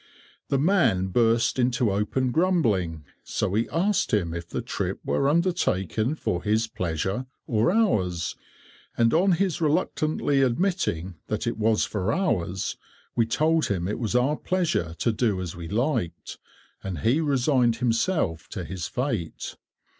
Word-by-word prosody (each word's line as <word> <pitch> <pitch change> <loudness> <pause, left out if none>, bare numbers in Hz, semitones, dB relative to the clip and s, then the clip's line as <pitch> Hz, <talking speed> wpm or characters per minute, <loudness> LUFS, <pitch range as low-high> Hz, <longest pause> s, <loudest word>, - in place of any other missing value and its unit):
The 140 - +2
man 135 - +2
burst 115 +4 +2
into 125 -3 +2
open 115 +6 0
grumbling, 110 - +1 0.2
so - - -1
we 110 +4 0
asked 195 +5 +1
him 90 -7 +1
if 85 0 -6
the - - -3
trip - - -3
were 75 - +1
undertaken 145 - +1
for 90 - -2
his 110 +2 +1
pleasure 95 +5 -3 0.2
or 115 +3 +2
ours, 95 - +1 0.6
and 115 -1 +3
on 185 +3 +4
his 180 -1 0
reluctantly 155 -3 +1
admitting 120 - 0
that 110 +2 -2
it 115 -1 -2
was 110 0 +2
for 100 0 -1
ours, 95 - -1 0.4
we 115 -1 +2
told 160 +7 +2
him 90 -3 -1
it 105 - -3
was 115 -1 -2
our 135 +5 +2
pleasure 165 - -1
to 115 - +1
do 110 -3 0
as 90 -3 -5
we 85 -1 -7
liked, 110 - -2 0.4
and 95 -6 -4
he 130 +8 +2
resigned 130 -4 +2
himself 115 - 0
to - - -6
his 95 -2 -4
fate. 115 - -3
115 Hz, 145 wpm, -25 LUFS, 95-150 Hz, 0.6 s, on